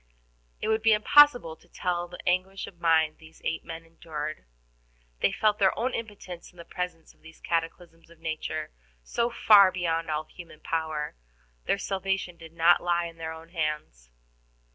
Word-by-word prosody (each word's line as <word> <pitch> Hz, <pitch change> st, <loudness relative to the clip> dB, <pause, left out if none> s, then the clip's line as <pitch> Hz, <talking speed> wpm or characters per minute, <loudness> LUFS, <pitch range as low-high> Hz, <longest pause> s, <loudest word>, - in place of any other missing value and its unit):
It -, -, 0 dB
would 220 Hz, 0 st, +2 dB
be 225 Hz, 0 st, +5 dB
impossible 245 Hz, -, +6 dB
to -, -, -25 dB
tell 175 Hz, -1 st, -2 dB
the 180 Hz, +1 st, -10 dB
anguish 185 Hz, +2 st, 0 dB
of 175 Hz, -, -14 dB
mind 160 Hz, -2 st, +3 dB
these 160 Hz, 0 st, -16 dB
eight 165 Hz, -, -1 dB
men 165 Hz, 0 st, -8 dB
endured; 155 Hz, -, -6 dB, 0.7 s
they -, -, +3 dB
felt 215 Hz, -1 st, +1 dB
their 190 Hz, -2 st, +3 dB
own 255 Hz, +3 st, -1 dB
impotence 205 Hz, -6 st, -7 dB
in 180 Hz, -, -25 dB
the 170 Hz, -, -10 dB
presence 180 Hz, -3 st, -5 dB
of -, -, -32 dB
these 160 Hz, 0 st, -15 dB
cataclysms 165 Hz, 0 st, -3 dB
of 170 Hz, -, -17 dB
nature 155 Hz, -1 st, -4 dB, 0.3 s
so 235 Hz, -, 0 dB
far 205 Hz, -5 st, +7 dB
beyond 165 Hz, -3 st, -1 dB
all 155 Hz, 0 st, -1 dB
human 165 Hz, -1 st, -13 dB
power. 160 Hz, -2 st, -2 dB, 0.5 s
Their -, -, +2 dB
salvation 195 Hz, -2 st, -2 dB
did 165 Hz, -1 st, -13 dB
not 170 Hz, +1 st, +5 dB
lie 175 Hz, -1 st, +1 dB
in 165 Hz, -1 st, -8 dB
their 160 Hz, -1 st, -5 dB
own 160 Hz, +1 st, -10 dB
hands. 150 Hz, -, -3 dB
170 Hz, 170 wpm, -27 LUFS, 160-190 Hz, 0.7 s, far